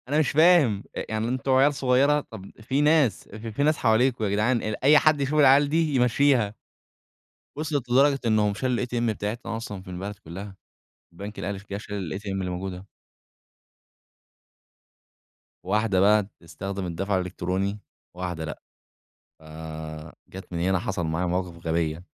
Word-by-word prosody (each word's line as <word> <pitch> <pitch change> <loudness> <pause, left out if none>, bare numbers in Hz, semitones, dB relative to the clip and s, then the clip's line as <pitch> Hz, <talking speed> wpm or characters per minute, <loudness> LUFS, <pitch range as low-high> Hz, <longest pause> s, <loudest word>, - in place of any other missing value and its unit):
أنا 145 +3 +1
مش 155 - +2
فاهم 155 - +4
أ - - -3
يعني 110 +1 -1
أنتم 130 +2 -1
عيال 135 +3 +5
صغيرة، 135 +2 +3
طَب 100 -4 -10
في 135 +6 0
ناس 150 -6 +3
ف - - -7
في 115 +6 -2
ناس 155 0 +3
حواليكم 115 +1 +2
ياجدعان، 110 +4 +1
أي 130 +8 +3
حد 155 -2 +3
يشوف 145 +3 0
العيال 140 0 +6
دي 160 -1 +1
يمشّيها، 125 -3 +3 1.0
وصلت 145 -4 -3
لدرجة 135 +2 +4
إنهم 105 -2 +2
شالوا 125 +2 -1
الATM 120 -1 -1
بتاعتنا 110 +2 -4
أصلًا 105 -4 -6
في 95 - -11
البلد 95 +3 -5
كلها، 95 +4 -8 0.6
البنك 100 +4 -8
الأهلي 100 0 -3
جه 100 - -2
شال 100 -4 -5
الATM 105 - -12
اللي 95 -1 -2
الموجودة. 90 +1 -5 2.8
واحدة 105 -3 +1
بقى 105 +2 +5
بتستخدم 95 +1 -7
الدفع 95 +3 -2
الإلكتروني، 95 +3 -2 0.3
وواحدة 90 -2 -4
لأ، 75 - -7 0.8
ف - - -23 0.9
جات 95 0 -11
من 85 - -3
هنا 95 +2 +2
حصل 95 -4 -3
معايا 80 +3 -1
مواقف 90 -1 -3
غبية. 80 +1 -1
105 Hz, 145 wpm, -25 LUFS, 95-130 Hz, 2.8 s, العيال